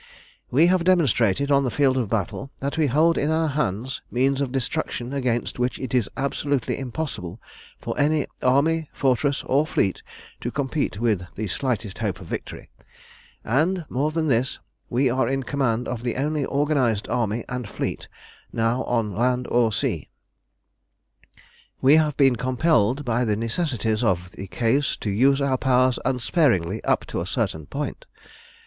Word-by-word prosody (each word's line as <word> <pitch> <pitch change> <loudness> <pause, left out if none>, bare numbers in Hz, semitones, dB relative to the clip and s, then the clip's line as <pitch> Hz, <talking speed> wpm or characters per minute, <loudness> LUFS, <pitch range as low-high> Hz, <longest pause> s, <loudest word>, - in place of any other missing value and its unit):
"We 150 +7 +5
have 180 0 +3
demonstrated 140 - +2
on 140 0 +4
the 130 - 0
field 135 +1 +2
of 125 -6 -1
battle 110 +5 -2
that 140 +2 -2
we 160 -3 +2
hold 155 +6 +3
in 145 - 0
our 160 0 +1
hands 130 -3 -2
means 135 +3 +1
of 135 -3 -1
destruction 135 -1 -3
against 125 -3 -1
which 125 +1 0
it 130 -2 -6
is 120 -5 +2
absolutely 140 -1 -1
impossible 120 - -5 0.4
for - - -5
any 150 0 +2 0.2
army 150 +5 +2
fortress 135 +1 +1
or 145 +4 +2
fleet 95 - 0 0.4
to 120 - -3
compete 140 -4 -2
with 110 -5 +1
the 110 - -3
slightest 110 0 -2
hope 105 -5 -2
of 95 - -10
victory; - - -7 0.7
and 165 - +1
more 140 +4 0
than 160 +1 -1
this, 130 -3 +1 0.3
we 130 +2 +2
are 125 -1 +1
in 135 0 -1
command 125 -3 0
of 120 -2 -4
the 120 -1 -2
only 145 +1 -1
organised 140 -7 +1
army 115 -1 -1
and 125 -4 -5
fleet - - -4 0.4
now 115 +3 0
on 115 -5 -1
land 125 +2 +1
or 120 -2 +3
sea. 100 - -2 1.7
We 140 +4 +6
have 150 -2 +1
been 135 -4 +4
compelled 130 0 +1
by 120 0 +1
the 110 -3 +1
necessities 115 - -1
of 90 -4 0
the 95 - -8
case 125 +8 0
to 105 - -3
use 135 +7 +3
our 135 -2 +1
powers 130 -1 +3
unsparingly 120 - +1
up - - +1
to - - -3
a - - -4
certain 80 -2 -2
point. - - -5
130 Hz, 160 wpm, -24 LUFS, 115-140 Hz, 1.7 s, We